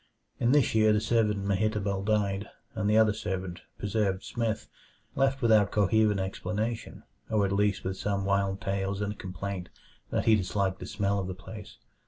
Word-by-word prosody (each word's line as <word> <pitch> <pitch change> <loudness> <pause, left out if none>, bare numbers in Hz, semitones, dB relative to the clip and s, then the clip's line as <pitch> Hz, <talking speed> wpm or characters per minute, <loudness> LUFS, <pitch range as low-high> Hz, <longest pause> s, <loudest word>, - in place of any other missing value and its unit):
In 120 - +3
this 145 -3 +4
year 110 -1 +5
the 105 - +3
servant 105 -3 +1
Mehitabel 100 0 0
died, 100 -1 0 0.2
and 105 -1 -1
the 105 - +4
other 110 -2 +5
servant, 95 -4 -4 0.2
Preserved 100 -2 -1
Smith, 115 -2 -2 0.5
left 135 0 +1
without 110 -4 +5
coherent 105 0 +3
explanation 105 +4 -3 0.3
or 105 -3 +2
at 95 - -1
least, 100 0 +1
with 95 - -1
only 95 0 -5
some 100 -1 -1
wild 100 0 +1
tales 95 0 -1
and 105 0 -1
a - - -18
complaint 95 -1 -5 0.4
that - - -1
he 110 - +6
disliked 95 -1 -1
the - - -7
smell 100 0 0
of 95 - -3
the 95 - -4
place. 105 +2 -10
100 Hz, 180 wpm, -29 LUFS, 95-110 Hz, 0.5 s, he